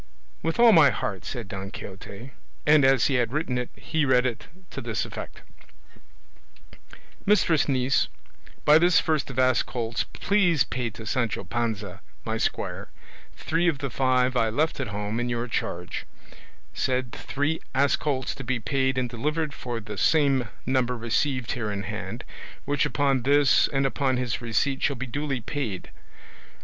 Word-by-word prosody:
"With 165 +5 -2
all 235 -1 +8
my 160 -8 +7
heart," 95 -2 -3
said 120 -5 -5
Don 95 0 -6
Quixote, 100 +3 -9 0.3
and 150 -1 +6
as 135 -2 +5
he 135 - +2
had 115 -1 -1
written 135 -4 -1
it 125 - -4
he 160 -1 -1
read 130 -2 +3
it 120 -3 -3 0.2
to - - -5
this - - -2
effect: - - -8 1.8
"Mistress 175 -8 +3
Niece, 130 0 +2 0.6
By 150 +1 +7
this 175 0 +5
first 155 -4 0
of 130 - -8
ass 130 -1 +4
colts 115 -2 -2
please 180 -8 +2
pay 125 -2 -3
to 110 +1 -10
Sancho 115 -3 -1
Panza, 100 -2 -3 0.2
my - - -1
squire, - - -2 0.5
three 165 +2 0
of 160 -5 +2
the 135 -1 -4
five 130 0 +2
I 115 -2 +2
left 150 +8 0
at - - -2
home 105 +2 -3
in 120 0 -1
your 120 0 -2
charge: 90 -6 -3 0.7
said 130 -1 -1
three 145 +2 -2 0.2
ass 140 +1 +4
colts 135 -3 -2
to 135 - -8
be 125 0 -1
paid 130 +3 0
and 130 -1 +1
delivered 150 +6 -2
for 120 -4 -4
the 105 -2 -7
same 140 -6 +3 0.2
number 125 -1 +1
received 120 +2 0
here 110 -4 -2
in 100 0 -3
hand, 105 +3 -5 0.4
which 145 0 +1
upon 140 -3 +1
this 140 +1 +4
and 135 -1 0
upon 135 -1 +1
his 125 -2 -2
receipt 130 +4 0
shall 140 - +1
be 130 +1 -4
duly 135 0 -3
paid. 110 -6 -4
130 Hz, 165 wpm, -26 LUFS, 115-145 Hz, 1.8 s, all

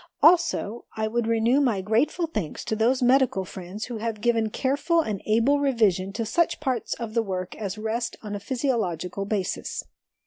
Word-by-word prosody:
Also, 320 - +3
I 220 0 0
would 235 +1 -1
renew 230 +4 +3
my 230 -8 +1
grateful 235 - +1
thanks 210 - -4
to 220 - -1
those 245 +4 +2
medical 250 -6 +3
friends 185 +4 -7
who 240 -2 -5
have 225 -1 -3
given 225 0 +2
careful 285 +8 +1
and 210 - -3
able 230 +7 +3
revision 215 -9 +2
to 230 +1 -2
such 340 +10 +1
parts 260 -6 -1
of 230 -2 -6
the 230 - +3
work 185 -3 -4
as 200 -1 -4
rest 225 +2 -2
on 210 -1 -5
a 205 - -3
physiological 200 - -2
basis. 195 -3 -2
225 Hz, 175 wpm, -25 LUFS, 205-260 Hz, -, Also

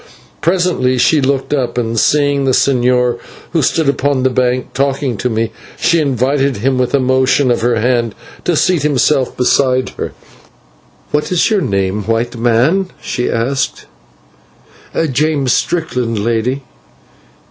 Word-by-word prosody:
Presently 170 -7 +1
she 150 +4 +3
looked 135 +1 0
up, 130 -4 -1
and, 115 -1 0
seeing 145 0 +2
the 130 - +2
señor, 125 -2 +2 0.3
who 165 - +1
stood 155 +3 +1
upon 140 -1 +1
a 130 - +3
bank 125 0 -1
talking 135 -2 -1
to 125 - -1
me, 115 0 -1 0.3
she 170 -1 +2
invited 135 -1 0
him 130 +4 0
with 125 +1 +1
a - - +3
motion 130 +1 +2
of 120 - 0
her 120 +1 +2
hand 120 -1 0 0.3
to 175 - +1
seat 175 0 +2
himself 140 -1 +1
beside 130 0 +2
her. - - -4 1.0
"What 150 +2 -1
is 180 +4 +2
your 210 -3 +2
name, 100 - -1
white 115 +2 -1
man?" 125 +11 +1
she 125 - -3
asked. 130 +4 -2 1.3
"James 140 -2 +1
Strickland, 125 -10 -1
lady." 115 +5 -1
130 Hz, 140 wpm, -15 LUFS, 120-145 Hz, 1.3 s, she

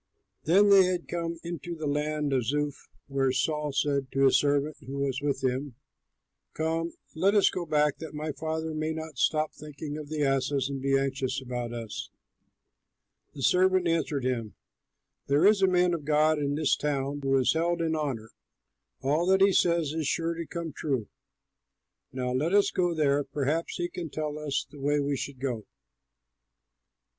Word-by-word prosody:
They 195 +3 +6
had 180 -1 -2
come 170 -1 -3
into 170 0 -5
the 155 -1 -5
land 150 0 -1
of 130 -3 +1
Zuph 145 +2 -2 0.2
when 135 -1 +1
Saul 150 +2 0
said 140 -1 0
to 135 +1 +3
his 135 - +5
servant 145 +1 +1
who 135 +1 -5
was 140 -1 -1
with 140 -2 -1
him, 130 0 -1 0.8
"Come, 165 +1 -1 0.2
let 190 +6 +2
us 205 - +5
go 175 -2 -4
back, 150 -1 +2
that 160 -2 -8
my 155 +1 -3
father 160 +2 -3
may 155 +1 -2
not 160 -4 -7
stop 155 -1 +1
thinking 150 0 -7
of 150 -1 -8
the 155 -1 -1
asses 135 0 +1
and 135 -1 -4
be 135 0 +2
anxious 135 -1 -1
about 125 -2 -4
us." 115 -3 -6 1.3
The 135 - -6
servant 185 +1 +4
answered 155 -5 0
him, 115 -5 -2 0.7
"There 145 +5 +3
is 205 -1 +5
a 190 - +5
man 180 -1 +3
of 165 -3 -3
God 155 +1 +3
in 145 -1 -1
this 150 -1 +2
town 145 -1 -2
who 135 0 +2
is 130 - +3
held 170 +2 0
in 160 -1 0
honor; 130 -8 -3 0.7
all 150 +6 +1
that 190 0 +4
he 195 0 +6
says 170 -5 +2
is 160 -3 -2
sure 165 +1 0
to 165 -1 -6
come 170 -3 -5
true. 135 -9 -2 1.0
Now 125 -1 -2
let 150 +9 +1
us 205 - +4
go 175 -2 +1
there; 145 -2 +2
perhaps 150 +4 -2
he 175 - -1
can 175 -2 -6
tell 150 0 -4
us 145 -3 -2
the 140 +1 -14
way 145 +2 +1
we 140 0 0
should 135 -1 -5
go." 125 -5 -3
150 Hz, 175 wpm, -28 LUFS, 135-165 Hz, 1.3 s, They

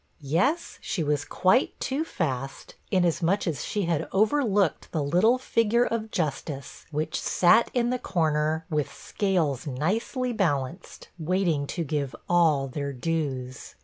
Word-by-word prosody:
Yes, 180 - 0
she 200 -7 -2
was 145 -1 0
quite 190 - +2
too 275 +4 -1
fast, 135 - -4 0.2
inasmuch 180 +1 +2
as 155 -8 -2
she 205 - -2
had 165 -3 0
overlooked 210 - +2
the 155 -3 -1
little 180 - +3
figure 235 -2 +2
of 220 -1 -2
justice, 150 -5 -4
which 155 +1 -2
sat 185 +6 +4
in 240 0 +2
the 250 - -1
comer, 160 -5 0
with 150 -2 0
scales 165 - -1
nicely 225 - -1
balanced, 165 - -2
waiting 165 -3 0
to 170 - -3
give 140 -3 -2
all 160 -6 +3
their 140 +1 -4
dues. 130 -3 -3
165 Hz, 135 wpm, -26 LUFS, 145-205 Hz, 0.2 s, sat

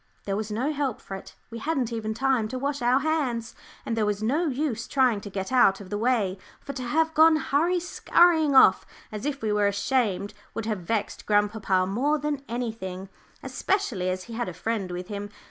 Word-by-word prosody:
There 195 - -1
was 215 +1 -3
no 255 +8 -1
help 280 -5 -2
for - - -10
it; 195 - -9 0.2
we 230 - -6
hadn't 260 -4 -1
even 220 -1 -3
time 260 -3 +1
to 255 - -5
wash 280 +1 -2
our 250 +3 +3
hands, 270 -7 -1 0.3
and 230 - -1
there 225 - +1
was 210 0 -1
no 300 +10 +1
use 260 -5 -2
trying 255 -6 +2
to 205 - -8
get 190 +1 -4
out 220 -7 +5
of 195 -1 -11
the 205 - -1
way, 215 -6 +1 0.2
for 280 - -7
to 255 - -5
have 320 +6 +1
gone 320 +1 +6
hurry 315 +4 +1
skurrying 335 -3 +3
off 225 -7 +7 0.3
as 215 +6 -4
if 280 -4 -4
we 215 - 0
were 205 -1 +3
ashamed 205 -1 0 0.2
would 225 - -3
have 215 -3 -2
vexed 205 +4 -3
grandpapa 205 -3 +2
more 260 +11 +1
than 295 -2 -2
anything, 220 -6 -4 0.3
especially 260 - -1
as 185 0 -3
he 230 - -10
had 235 -4 -2
a 175 - -9
friend 205 0 -2
with 180 0 -5
him. 205 0 -5
230 Hz, 205 wpm, -26 LUFS, 205-280 Hz, 0.3 s, off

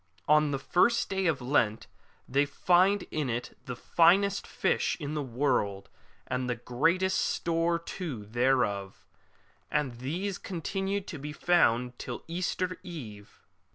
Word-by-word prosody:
On 150 0 +5
the 140 - -1
first 180 - +2
day 190 -1 +1
of 150 -5 0
Lent 120 -5 +1 0.4
they 140 +2 +3
find 180 +7 +3
in 150 -4 -1
it 120 +1 -4
the 125 - -5
finest 190 +9 +3
fish - - 0
in 150 -1 -4
the 150 - -1
world, 120 -7 -1 0.4
and 125 -1 -3
great 165 +9 +2
store 170 -2 +1
too 165 - -6
thereof; 115 -4 0 0.6
and 135 -6 -1
these 175 +9 -3
continue 195 +3 -3
to 165 -5 -8
be 150 +2 -6
found 125 -9 +2
till 120 - -6
Easter 185 +2 -2
Eve. 120 - -10
150 Hz, 130 wpm, -29 LUFS, 125-175 Hz, 0.6 s, On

